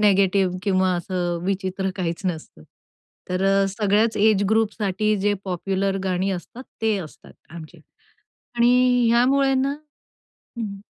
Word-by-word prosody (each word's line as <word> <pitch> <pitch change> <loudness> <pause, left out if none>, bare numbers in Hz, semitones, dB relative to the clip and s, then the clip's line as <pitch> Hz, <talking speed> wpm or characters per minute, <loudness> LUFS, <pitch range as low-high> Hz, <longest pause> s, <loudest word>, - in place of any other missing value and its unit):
Negative 195 -2 +3
किंवा 185 -2 +1
असं 175 -1 -2
विचित्र 190 0 -2
काहीच 170 -2 -3
नसतं. 160 - -5 0.7
तर 180 +1 -1
अ, 195 0 +3
सगळ्याच 210 +2 +1
एज 210 -1 +3
ग्रुपसाठी 215 -1 +1
जे 205 +1 +1
पॉप्युलर 195 +1 -2
गाणी 185 +1 0
असतात, 195 +7 -7 0.2
ते 220 -2 +2
असतात 155 -5 -11 0.2
आमचे 160 -2 -11 0.8
आणि 245 0 +4
ह्यामुळे 265 +3 +3
ना, 270 +2 0 0.8
हं, 200 -4 -5
195 Hz, 120 wpm, -22 LUFS, 185-220 Hz, 0.8 s, आणि